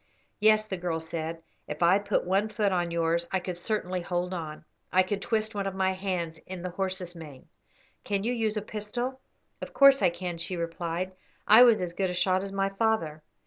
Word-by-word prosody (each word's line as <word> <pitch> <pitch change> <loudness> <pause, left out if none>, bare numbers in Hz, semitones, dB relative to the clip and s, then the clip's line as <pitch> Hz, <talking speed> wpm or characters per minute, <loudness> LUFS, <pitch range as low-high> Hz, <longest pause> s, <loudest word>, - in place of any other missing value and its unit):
"Yes," 215 0 +5
the 195 -3 -4
girl 175 -2 -2
said, 160 0 -5 0.2
"if 150 +3 -3
I 180 +4 +5
put 205 - 0
one 195 +4 +1
foot 210 -2 0
on 175 -2 0
yours 170 0 0
I 190 - +1
could 180 0 -5
certainly 185 -1 -2
hold 180 +1 -2
on. 155 -3 -6 0.3
I 185 +1 +5
could 195 +2 -3
twist 220 0 -1
one 200 -1 -2
of 195 - -4
my 190 0 +2
hands 180 -4 -3
in 185 -1 -7
the 180 - -4
horse's 185 -1 -3
mane." 150 -6 -11 0.6
"Can 200 -1 -1
you 240 +3 0
use 220 -2 0
a 210 - -2
pistol?" 240 +5 -4 0.4
"Of - - -7
course 275 -1 +7
I - - +5
can," 175 0 -5
she 170 +2 -3
replied. 170 +2 -3 0.4
"I 220 +3 +9
was 235 -6 +6
as 175 -1 -4
good 190 +1 -1
a 180 - -3
shot 185 +1 +2
as 195 0 -5
my 195 0 0
father." 195 -7 0
185 Hz, 210 wpm, -28 LUFS, 170-205 Hz, 0.6 s, I